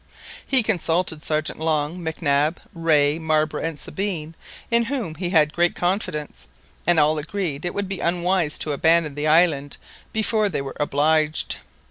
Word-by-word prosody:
He 260 -3 +6
consulted 170 -5 0
Sergeant 155 0 -2
Long, 160 +2 -1
Mac 160 0 -5
Nab, 145 +3 +2
Rae, 155 -3 +2
Marbre, 155 -1 0
and 165 -2 -3
Sabine, 170 -4 -4 0.4
in 235 0 +3
whom 240 - -3
he 175 +3 -4
had 155 -3 +3
great 175 0 +2
confidence, 150 - -3 0.4
and 175 -2 +5
all 150 +1 +3
agreed 160 -2 -3
that - - -3
it - - -4
would 200 -1 -1
be 190 -1 -5
unwise 175 -2 0
to 150 - -2
abandon 160 +1 +2
the 150 +2 -2
island 155 -3 +2 0.3
before 220 -1 +1
they 155 - -2
were 135 - -7
obliged. 155 +2 +1
160 Hz, 160 wpm, -22 LUFS, 150-180 Hz, 0.4 s, He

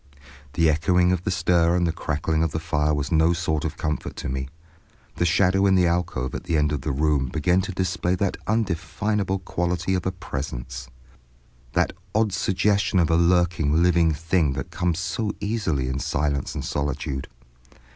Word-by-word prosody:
The 80 +1 +3
echoing 90 +3 +3
of 90 -1 -1
the - - 0
stir 85 -1 +2
and 85 -2 +1
crackling 80 +1 -1
of 80 - +2
the 80 - -3
fire 75 -2 0
was 75 +3 -1
no 80 +1 +4
sort 80 -3 -1
of - - -3
comfort 75 -1 -3
to - - -5
me. 65 +1 -3 0.7
The 85 - +1
shadow 95 +3 +3
in 95 - +4
the 90 -1 +4
alcove 85 -7 -1
at - - -5
the 85 -2 +1
end 75 0 +2
of 75 -3 -2
the 70 - -2
room 70 -1 +1
began 90 +7 +1
to 95 - -4
display 90 0 -1
that 95 +1 -1
undefinable 100 -1 -1
quality 90 0 -2
of 90 -1 -1
a - - +1
presence, 65 -8 -6 0.9
that - - +1 0.2
odd 110 -2 +2
suggestion 100 +1 +1
of 85 -3 +3
a - - +4
lurking 85 -2 +3
living 85 -2 +4
thing 80 -1 +1
that 70 -2 -5
comes 90 -2 0
so 105 +3 -2
easily 100 - -1
in 65 +1 -2
silence 70 -1 -1
and - - -4
solitude. 70 -2 -3
85 Hz, 175 wpm, -24 LUFS, 75-90 Hz, 0.9 s, no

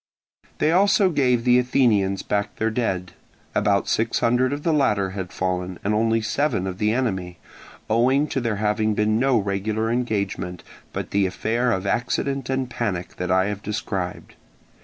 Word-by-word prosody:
They 155 - +2
also 190 +1 +4
gave 125 -6 +2
the 125 0 +5
Athenians 110 -7 +2
back 100 0 -2
their 110 0 0
dead. 95 -6 -2 0.4
About 100 -1 +2
six 115 +1 +1
hundred 125 +2 +2
of 145 +1 -4
the 165 - +2
latter 105 -10 +2
had 95 -2 -5
fallen 90 -1 -2
and 105 - 0
only 115 +1 +2
seven 110 -3 0
of 95 0 -5
the 105 0 +2
enemy, 95 -8 -2 0.5
owing 130 +6 +3
to 135 - -1
there 115 -3 -1
having 105 +1 0
been 110 +1 +2
no 135 -1 +3
regular 105 +2 -1
engagement, 100 -7 -2 0.3
but - - -5
the 100 -1 +2
affair 115 +6 0
of 95 -3 -1
accident 125 +4 -1
and 130 -1 0
panic 105 -7 -4
that 90 -1 -3
I 95 +1 +3
have 105 0 -3
described. 100 -3 -4
110 Hz, 165 wpm, -23 LUFS, 95-125 Hz, 0.5 s, the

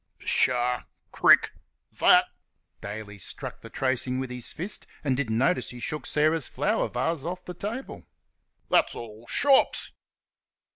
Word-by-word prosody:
"Pshaw! 125 -1 +1 0.3
Crick!... - - +5 0.5
That" - - +7 0.6
(Daly 105 0 -7
struck - - -7
the - - -10
tracing 130 -1 0
with 130 -1 -4
his 125 -1 -5
fist, 180 +7 -5 0.2
and 135 -4 +1
didn't 120 -5 -1
notice 135 +9 +1
he 125 - -8
shook 150 +3 -4
Sarah's 155 -1 +2
flower 215 +3 0
vase 165 -3 -1
off 180 +2 -5
the 180 - -6
table), 215 +9 -6 0.6
"that's - - +3
all 115 0 -9
shops." 280 -2 +3
130 Hz, 135 wpm, -27 LUFS, 120-170 Hz, 0.6 s, That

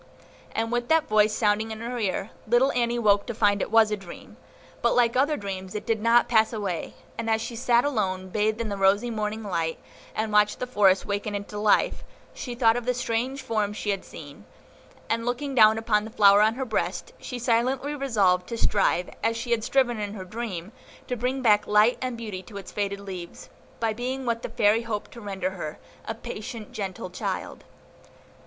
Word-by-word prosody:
And 225 +1 -1
with 240 0 -1
that 320 -1 +3
voice 215 0 +4
sounding 215 0 +1
in 220 0 -6
her 240 +1 -4
ear, 200 -1 -2 0.2
little 245 +4 +4
Annie 240 -1 0
woke 205 -2 +3
to 235 - -4
find 205 -2 +2
it - - -2
was 220 -1 +5
a - - +2
dream; 195 -4 -12 0.5
but - - +2
like 235 -1 +3
other 290 +4 +2
dreams 190 -1 -6
it 210 - -4
did 225 -2 0
not 230 +2 +4
pass 220 -2 +3
away; 200 -7 -4 0.2
and 230 0 -2
as 220 0 +2
she 230 +1 -5
sat 240 +1 +3
alone, 190 -9 -1
bathed 215 +3 0
in 230 -2 -2
the 200 - -3
rosy 200 +5 +3
morning 215 0 -3
light, 165 -5 -2 0.4
and 215 0 -2
watched 210 0 +4
the 250 - -3
forest 200 -6 +3
waken 205 0 -2
into 205 +1 -5
life, 210 0 +2 0.3
she 245 -2 -6
thought 230 -2 +4
of 245 -1 -3
the 250 - +2
strange 250 +3 -2
forms 215 -4 -1
she 205 - -1
had 195 - -3
seen, - - -11 0.6
and, 230 0 0
looking 245 +4 -2
down 220 -3 +6
upon 220 -2 +1
the 220 - -7
flower 205 -3 +6
on 220 +2 +3
her 265 +1 -3
breast, 220 -3 -2
she 250 - -6
silently 250 +4 +1
resolved 205 -10 +2
to 230 - -4
strive, 195 -5 +2 0.2
as 230 0 +1
she 235 +1 -5
had 230 -2 +2
striven 245 -2 +2
in 205 0 -4
her 190 -3 -7
dream, 200 -3 -5 0.3
to 250 - -2
bring 255 +3 -2
back 210 -3 +4
light 210 +3 +4
and 255 -2 -3
beauty 210 -5 -6
to 200 +2 -11
its 195 - -8
faded 200 -1 -2
leaves, 185 -3 -8 0.3
by 225 -1 0
being 255 +3 -4
what 230 -1 -1
the - - -5
Fairy 210 +2 +3
hoped 225 -3 -4
to 235 - -11
render 190 -2 -3
her, 155 -5 -6 0.3
a 225 - -3
patient, 220 -1 -7
gentle 195 -4 -5
little 180 - -8
child. - - -4
220 Hz, 205 wpm, -26 LUFS, 205-240 Hz, 0.6 s, down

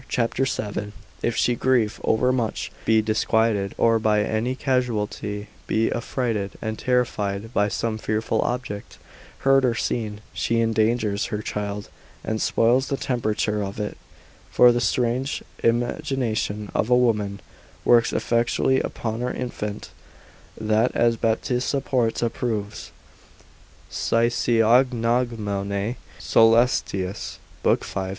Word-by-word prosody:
c. 115 -2 +1 0.2
7, 105 -4 -3 0.3
if 120 - 0
she 120 - +2
grieve 120 -3 +1
overmuch, 125 -1 0
be 110 -1 +4
disquieted, 110 -2 +1
or 115 -1 +3
by 105 -1 +2
any 110 +4 -1
casualty 110 -6 -1 0.2
be 110 +1 +1
affrighted 115 -4 -2
and 110 -1 -4
terrified 110 -4 -1
by 105 -3 +2
some 110 +1 -2
fearful 110 +1 -1
object, 120 -4 -4 0.4
heard 135 0 +4
or 120 -2 +2
seen, 105 -2 -2
she 115 0 0
endangers 110 -2 +1
her 105 0 -4
child, 105 0 -4 0.4
and 110 0 -2
spoils 125 +4 +2
the 140 - -1
temperature 110 -4 -1
of 100 +1 -5
it; 105 - -3 0.5
for 125 0 +6
the 120 0 0
strange 125 +3 0 0.2
imagination 115 -3 -1
of 110 - 0
a 125 - +5
woman 105 -5 +1 0.5
works 120 -1 +5
effectually 120 +3 +1
upon 115 0 -3
her 125 - -1
infant, 105 -4 -5 0.7
that 110 +2 +2
as 120 -1 +3
Baptista 125 +4 0
Porta 120 -3 0
proves, 110 -3 -4 1.0
Physiog. 115 +1 +3
caelestis 115 -2 0 0.3
l. - - +5
5. - - -12
c. - - -4
115 Hz, 115 wpm, -24 LUFS, 105-120 Hz, 1.0 s, for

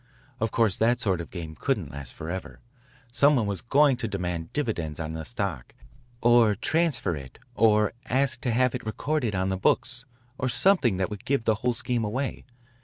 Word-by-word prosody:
Of 115 - 0
course 110 -4 +2
that 120 +2 +2
sort 95 -7 0
of 85 - -9
game 80 -4 -7
couldn't 100 - -2
last 70 -3 -8
forever. 85 +4 -6 0.5
Some 145 +3 +5
one 120 -5 +1
was 100 -2 -2
going 140 +2 +4
to 120 -2 -3
demand 90 -5 -3
dividends 85 - -2
on 80 0 -4
his 80 -1 -5
stock, 100 - -4 0.5
or 120 -3 +5
transfer 135 - 0
it, 65 -3 -10 0.2
or 105 -1 +3 0.2
ask 135 -1 +1
to 125 - 0
have 125 +1 +2
it - - -4
recorded 120 0 -1
on 95 0 0
the 95 - -1
books, 125 +6 0 0.3
or 130 - 0
something 125 - +3
that 95 +2 -1
would 105 -1 -7
give 135 -4 0
the 110 - +4
whole 125 0 +1
scheme 120 0 -1
away. 130 +6 -3
110 Hz, 185 wpm, -26 LUFS, 90-125 Hz, 0.5 s, Some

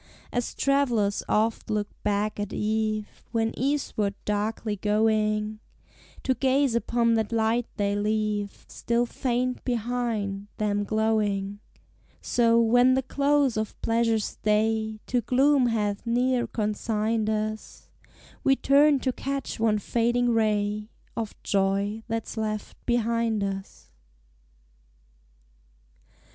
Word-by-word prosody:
As 245 -1 -2
travellers 245 -8 +1
oft 220 +2 +1
look 210 -1 0
back 210 +1 -1
at 205 0 -3
eve 215 0 -1 0.2
When 225 -1 0
eastward 255 -7 -1
darkly 210 +1 -1
going, 215 +1 +1 0.6
To 260 - +2
gaze 265 +1 +2
upon 235 0 +2
that 220 -1 0
light 230 +1 +1
they 200 -1 +1
leave 210 -1 -1
Still 235 +1 0
faint 250 +1 -2
behind, 230 -4 -2
them 205 -1 0
glowing, 205 -2 0 0.6
So, 230 -1 +3
when 245 +3 +5
the 265 - +1
close 280 -2 +2
of 215 0 -3
pleasure's 225 -2 +1
day 220 +1 +1
To 250 -1 0
gloom 260 +3 +3
hath 210 -3 -1
near 245 +1 +1
consigned 215 0 -1
us, 215 0 -4 0.5
We 270 - +4
turn 280 +1 +4
to 260 - 0
catch 275 -1 -4
one 220 -1 +3
fading 240 +3 +1
ray 210 -1 0 0.3
Of 220 -2 -4
joy 200 +2 0
that's 225 0 -4
left 215 -1 -3
behind 230 -2 +1
us. 195 -1 -6
220 Hz, 110 wpm, -26 LUFS, 210-240 Hz, 0.6 s, when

